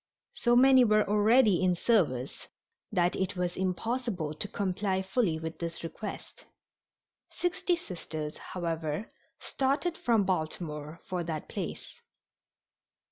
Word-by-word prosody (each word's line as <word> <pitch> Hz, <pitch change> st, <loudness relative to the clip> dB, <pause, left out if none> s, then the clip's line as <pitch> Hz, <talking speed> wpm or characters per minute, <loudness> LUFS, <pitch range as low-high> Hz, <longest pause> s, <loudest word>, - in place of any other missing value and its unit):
So 240 Hz, -1 st, +2 dB
many 260 Hz, +1 st, +7 dB
were 215 Hz, -2 st, +3 dB
already 210 Hz, -1 st, +4 dB
in 180 Hz, -1 st, +3 dB
service 165 Hz, -, +1 dB, 0.4 s
that 175 Hz, 0 st, +2 dB
it 190 Hz, +1 st, -1 dB
was 180 Hz, -1 st, -1 dB
impossible 190 Hz, -2 st, -2 dB
to 155 Hz, -, -4 dB
comply 190 Hz, -1 st, -1 dB
fully 190 Hz, -4 st, +1 dB
with 160 Hz, 0 st, -6 dB
this 170 Hz, -1 st, -5 dB
request. 195 Hz, +5 st, -7 dB, 0.9 s
Sixty 360 Hz, 0 st, 0 dB
Sisters, 160 Hz, -, -6 dB
however, 165 Hz, +1 st, -3 dB, 0.3 s
started 280 Hz, +6 st, -1 dB
from 230 Hz, -4 st, +3 dB
Baltimore 155 Hz, -3 st, -3 dB
for 180 Hz, -2 st, -2 dB
that 160 Hz, -2 st, -4 dB
place. -, -, -5 dB
185 Hz, 115 wpm, -30 LUFS, 165-230 Hz, 0.9 s, many